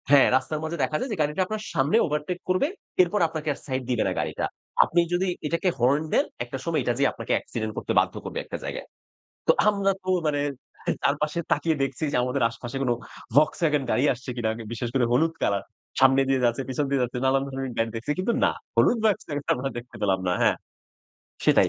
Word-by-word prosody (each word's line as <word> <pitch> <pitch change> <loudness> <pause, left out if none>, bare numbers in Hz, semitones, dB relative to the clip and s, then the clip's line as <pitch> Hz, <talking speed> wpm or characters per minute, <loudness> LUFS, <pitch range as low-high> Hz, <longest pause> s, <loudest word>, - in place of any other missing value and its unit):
হ্যাঁ। 140 -1 +7
রাস্তার 140 +4 0
মাঝে 160 +2 -3
দেখা 155 - 0
যায় 265 - -3
যে 210 - -2
গাড়িটা 150 +5 0
আপনার 215 +2 -4
সামনে 145 +6 +3
ওভারটেক 150 +4 -2
করবে, 185 +10 +3 0.3
এরপর 185 +4 +2
আপনাকে 155 -1 -6
আর - - -13
সাইড 130 -1 -2
দিবে 120 -3 +2
না - - 0
গাড়িটা। - - -2 0.4
আপনি 175 - +1
যদি 185 +2 +1 0.2
এটাকে 170 +4 +1
হর্ন 135 +5 +3
দেন, - - +4 0.2
একটা 125 +2 -6
সময় 165 -2 +1
এটা 120 - +1
যেয়ে 140 -1 +3
আপনাকে 115 - -6
অ্যাক্সিডেন্ট 110 -2 -3
করতে - - -2
বাধ্য - - +1
করবে - - -4
একটা - - -5
জায়গায়। - - -5 0.6
তো - - +8 0.2
আমরা 200 -1 +2
তো 185 - -4 0.2
মানে 145 -1 +1 0.6
চারপাশে 150 +3 +1
তাকিয়ে 160 +2 +2
দেখছি 135 +2 -3
যে - - +1
আমাদের 125 +1 0
আশেপাশে 120 +2 -7
কোনো 125 -2 +2 0.4
Volkswagen 150 0 +3
গাড়ি 125 - +2
আসছে 130 +2 -10
কিনা, 115 -2 0 0.2
বিশেষ 120 +1 -3
করে 130 -3 +3
হলুদ 160 +6 +3
কালার। 100 -1 +1 0.4
সামনে 135 0 +6
দিয়ে 130 -2 +2
যাচ্ছে, 120 +2 +1
পেছন 135 +3 -1
দিয়ে 140 -1 +1
যাচ্ছে, 125 +1 -3
নানান 135 +1 +3
ধরনের 135 -1 -4
গাড়ি 115 0 +1
দেখছি। 115 +6 -2
কিন্তু 205 +6 +1
না, - - +4 0.2
হলুদ 240 - +4
Volkswagen 150 -9 0
আমরা 135 +2 -2
দেখতে 120 +1 -9
পেলাম 95 -2 +2
না। 90 - +2
হ্যাঁ, - - +4 0.9
সেটাই। - - +5
140 Hz, 200 wpm, -25 LUFS, 125-160 Hz, 0.9 s, তো